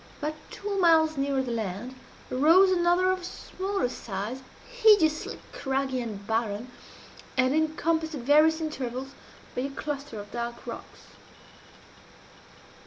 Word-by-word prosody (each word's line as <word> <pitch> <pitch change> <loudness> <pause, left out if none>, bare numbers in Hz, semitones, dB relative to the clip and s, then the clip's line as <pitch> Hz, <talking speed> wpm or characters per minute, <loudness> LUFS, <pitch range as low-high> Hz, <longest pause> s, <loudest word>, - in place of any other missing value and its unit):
About 300 0 -2 0.2
two 400 -1 -3
miles 320 -3 +5
nearer 275 -1 0
the 250 - -4
land 225 +2 -3 0.4
arose 330 +9 +6
another 355 +1 +3
of 370 -1 -2
smaller 380 -2 -3
size, 225 +1 -5 0.3
hideously 410 -11 +3
craggy 265 -1 -1
and 210 -4 -6
barren, 225 +2 -2 0.7
and 255 +1 +3
encompassed 315 +1 0
at 275 - -5
various 305 +5 +5
intervals 270 -3 -4 0.4
by 250 - -1
a 275 - -2
cluster 280 -4 -5
of 205 0 -9
dark 235 0 -5
rocks. - - -8
280 Hz, 120 wpm, -27 LUFS, 245-325 Hz, 0.7 s, arose